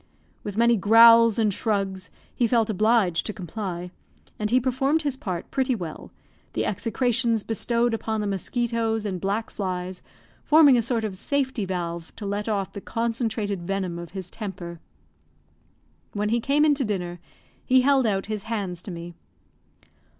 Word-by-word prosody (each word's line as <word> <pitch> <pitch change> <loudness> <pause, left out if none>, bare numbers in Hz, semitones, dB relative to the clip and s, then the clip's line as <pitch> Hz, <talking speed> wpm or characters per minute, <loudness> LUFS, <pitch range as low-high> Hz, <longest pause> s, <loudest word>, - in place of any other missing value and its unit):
With 205 -1 -6
many 235 0 +4
growls 230 +2 +7
and 215 -3 +2
shrugs, 195 -4 -2 0.2
he 240 - +1
felt 225 -2 +2
obliged 215 -4 +2
to 215 - -3
comply; 180 -2 -5 0.5
and 210 0 -1
he 250 +3 +4
performed 270 +5 +1
his 285 -3 -1
part 185 -10 -5
pretty 265 -2 +1
well, 170 -7 -7 0.4
the - - -1
execrations 230 +2 0
bestowed 235 +2 0
upon 220 -1 -2
the 210 - -2
mosquitoes 225 +2 -1
and 185 -4 -3
black 205 +3 -2
flies 185 -2 -4 0.4
forming 300 -3 +6
a 240 - +3
sort 230 0 -1
of 210 -3 -3
safety 260 +1 -1
valve 170 -2 -4
to 210 - -7
let 205 +2 -2
off 200 -3 -2
the 200 - -7
concentrated 225 -4 -2
venom 185 -1 -3
of 170 -1 -8
his 185 -2 -6
temper. 180 -5 -7 1.3
When 210 0 -1
he 235 +2 +2
came 285 +5 +2
in 300 - +5
to 280 -1 -1
dinner, 180 -5 -3 0.4
he 255 0 +4
held 270 -2 +3
out 195 -2 0
his 215 -1 -4
hands 195 -6 -3
to - - -9
me. 170 -1 -7
215 Hz, 160 wpm, -25 LUFS, 190-235 Hz, 1.3 s, growls